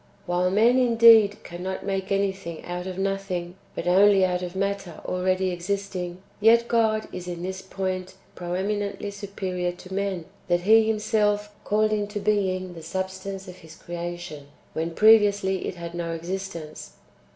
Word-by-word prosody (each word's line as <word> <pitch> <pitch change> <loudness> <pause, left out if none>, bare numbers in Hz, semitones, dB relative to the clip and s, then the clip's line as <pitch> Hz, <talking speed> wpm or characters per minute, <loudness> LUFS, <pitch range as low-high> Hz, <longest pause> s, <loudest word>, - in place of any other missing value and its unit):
^ - - -33 0.2
While 175 +1 +1
men, 230 +6 +4
indeed, 230 -4 +6
cannot 180 +3 -5
make 195 -1 -2
anything 195 -4 -2
out 180 +1 -4
of 185 -1 -5
nothing, 195 -3 -2 0.2
but - - -4
only 195 +2 +5
out 180 -1 -1
of 180 0 -5
matter 195 -2 -2
already 185 +1 0
existing, 180 0 -4 0.2
yet 230 +2 +5
God 220 -2 +2
is 180 0 -6
in 175 -1 -5
this 190 +1 -4
point 185 -1 -4 0.2
pre 175 - -8
eminently 200 +2 -2
superior 190 -3 -3
to 185 +1 -11
men, 195 -4 -2 0.2
that 175 0 +2
He 220 +3 +5
Himself 210 -1 +1
called 215 +1 +2
into 205 0 -2
being 185 -3 0
the 165 - -9
substance 190 +3 -5
of 180 0 -10
His 160 -2 -14
creation, 175 -4 -6 0.3
when 165 +1 -3
previously 205 -3 +4
it - - -4
had 170 -1 -7
no 170 -1 -3
existence. 170 -2 -6
190 Hz, 155 wpm, -25 LUFS, 175-205 Hz, 0.3 s, indeed